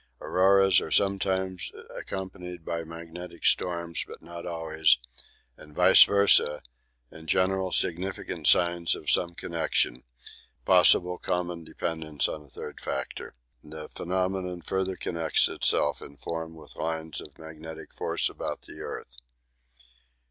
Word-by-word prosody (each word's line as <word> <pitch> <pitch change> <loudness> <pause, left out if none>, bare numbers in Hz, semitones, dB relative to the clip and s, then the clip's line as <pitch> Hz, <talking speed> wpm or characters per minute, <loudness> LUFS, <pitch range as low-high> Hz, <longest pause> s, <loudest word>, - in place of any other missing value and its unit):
Auroras 95 0 +4
are - - -5
sometimes 95 0 +1 0.2
accompanied 90 -3 -7
by 85 -1 -3
magnetic 85 +2 -9
storms, 85 -2 +1
but - - -10
not 85 0 -9
always, 80 -2 +2 0.6
and 75 -1 -15
vice - - +8
versa 100 -7 +4 0.5
in 80 0 -12
general 95 +2 +1
significant 90 +3 -1
signs 85 -1 +4
of - - -1
some 85 -1 +2
connection 60 -5 -1 0.6
possible 90 -1 +5
common 90 -1 -2
dependents 80 -2 -3
on 75 - -5
a 75 - -18
third - - -9
factor. 65 - -5 0.3
The 75 0 -9
phenomenon 90 -1 -2
further 95 +1 -1
connects 85 -3 +1
itself 75 -1 0
in 70 - -11
form 80 +1 -5
with 80 - -12
lines 80 0 -3
of - - -13
magnetic 80 0 -10
force - - 0
about - - -5
the - - -11
earth. - - -7
85 Hz, 125 wpm, -27 LUFS, 80-95 Hz, 0.6 s, vice